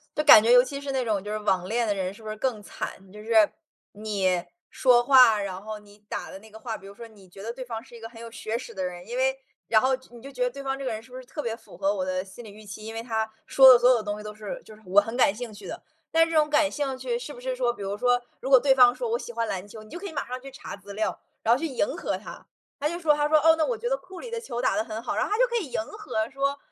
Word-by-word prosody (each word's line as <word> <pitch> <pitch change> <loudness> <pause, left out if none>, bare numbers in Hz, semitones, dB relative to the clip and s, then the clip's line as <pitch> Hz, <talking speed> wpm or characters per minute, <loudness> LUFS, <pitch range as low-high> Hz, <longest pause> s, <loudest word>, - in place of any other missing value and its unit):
就 300 - +1
感 290 -8 +10
觉 230 +2 +3
尤 245 0 +8
其 280 +1 -6
是 280 -1 -5
那 260 -1 0
种 210 -4 0
就 210 - -5
是 - - -1
网 190 -3 0
恋 235 +2 0
的 205 - +1
人 190 -1 -3
是 220 - -16
不 215 - -6
是 215 - -4
更 220 -4 -2
惨。 195 -1 -7
就 210 +1 -11
是， 220 -2 +4 0.4
你 195 -4 -1 0.3
说 245 -2 +4
话， 250 -6 +7
然 190 -1 -5
后 215 0 -7
你 205 0 -19
打 - - -5
的 190 - -9
那 220 +2 -16
个 220 - -12
话 225 -2 -5
比 195 - -14
如 200 - -12
说 235 - -10
你 200 -4 -18
觉 195 +2 -12
得 230 - -3
对 255 0 -7
方 225 -1 -6
是 255 - -19
一 - - -11
个 225 - -7
很 230 -1 -13
有 230 -1 -9
学 225 0 -3
识 235 -2 -9
的 190 -2 -4
人， 175 -1 -6
因 240 +2 -4
为 265 +1 +1 0.3
然 220 -1 +4
后 260 +1 +2 0.2
你 240 -1 -13
就 275 +2 -10
觉 250 -1 -8
得 250 - +2
对 275 +2 -9
方 270 0 -2
这 270 - -5
个 245 - -1
人 220 +1 -6
是 255 - -19
不 255 - -8
是 255 - -10
特 300 +4 -6
别 230 -4 -2
符 225 -6 -16
合 195 +1 +1
我 185 -2 -2
的 185 0 -2
心 200 +5 -12
理 215 - -10
预 215 +1 -14
期， 210 +1 -9
因 225 - -6
为 225 - -5
他 220 -2 -1 0.2
说 265 -1 +9
的 - - +7
所 245 - +5
有 235 -3 +3
东 205 0 -4
西 210 - -9
都 210 0 -7
是 210 -2 -7
就 215 - -14
是 215 - -20
我 195 +3 +5
很 225 +3 -6
感 205 -5 +4
兴 240 -1 -7
趣 200 -2 -11
的。 - - -7 0.3
但 330 0 +5
是 330 - -6
这 320 - +2
种 300 0 +4
感 295 -1 +3
兴 275 -3 -2
趣 475 - -2
是 - - -7
不 - - -12
是 - - -2
说 240 - +1
比 205 - -12
如 200 +1 -3
说， 245 +2 +3 0.2
如 265 - -5
果 265 - +9
对 270 0 +4
方 250 -2 +6
说 480 -2 -3
我 470 - +1
喜 240 - -8
欢 230 0 -1
篮 190 +1 -4
球， 215 +1 -11
你 215 - -16
就 345 - -7
可 400 - -8
以 320 - -8
马 280 - -3
上 255 +1 -5
去 275 - -9
查 290 +4 -9
资 200 0 -11
料， 215 +2 -2 0.2
然 230 - +5
后 250 - +1
去 330 - -1
迎 270 +1 0
合 - - -2
他， - - -11 0.3
他 295 - 0
就 340 - -4
说 320 -4 +3
他 295 0 +1
说， 310 0 +5
哦， 320 +2 +6
那 315 - +2
我 485 -3 -2
觉 480 - -3
得 - - +1
库 375 -6 -12
里 485 - -8
的 465 - -2
球 240 - -4
打 255 - +1
得 220 - +1
很 220 0 -6
好， - - -2
然 - - +1
后 - - -6
他 420 - +1
就 - - +5
可 475 - -4
以 300 - -7
迎 - - -1
合 230 - -4
说： 275 +1 -1
235 Hz, 360 characters per minute, -26 LUFS, 210-275 Hz, 0.4 s, 感